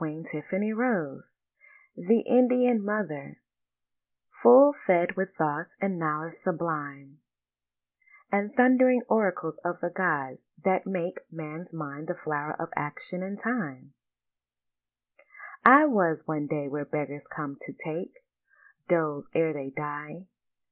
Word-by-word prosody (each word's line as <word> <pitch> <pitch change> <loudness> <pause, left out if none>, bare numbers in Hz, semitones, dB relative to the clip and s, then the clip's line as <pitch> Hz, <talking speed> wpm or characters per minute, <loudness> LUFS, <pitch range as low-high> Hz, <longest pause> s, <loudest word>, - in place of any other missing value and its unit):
THE 215 - -3
INDIAN 250 -2 +4
MOTHER 175 - -4 1.0
Full 275 +4 +9
fed 180 -9 +1
with 190 0 -3
thoughts 155 +2 -2
and 195 -3 -2
knowledges 160 +1 -3
sublime, 145 -5 -4 1.1
And 200 +1 0
thundering 255 -1 +5
oracles 185 -7 0
of 175 0 -3
the 175 +1 -3
gods, 155 -8 -2 0.2
that 190 -1 +1
make 185 -2 -3
Man's 165 +1 -9
mind 150 -1 -8
the 180 - -3
flower 155 -2 -4
of 165 - -4
action 180 +5 -5
and 195 +2 -6
of - - -17
time, 155 - -4 1.7
I 285 +3 +10
was 185 - +2
one 150 -2 -3
day 145 -2 -3
where 145 +1 -4
beggars 145 -1 -5
come 145 -2 -6
to - - -7
take 165 +1 -7 0.7
Doles 155 -5 0
ere 160 -1 +2
they 140 -2 -6
die. 150 +4 -7
170 Hz, 115 wpm, -27 LUFS, 150-205 Hz, 1.7 s, I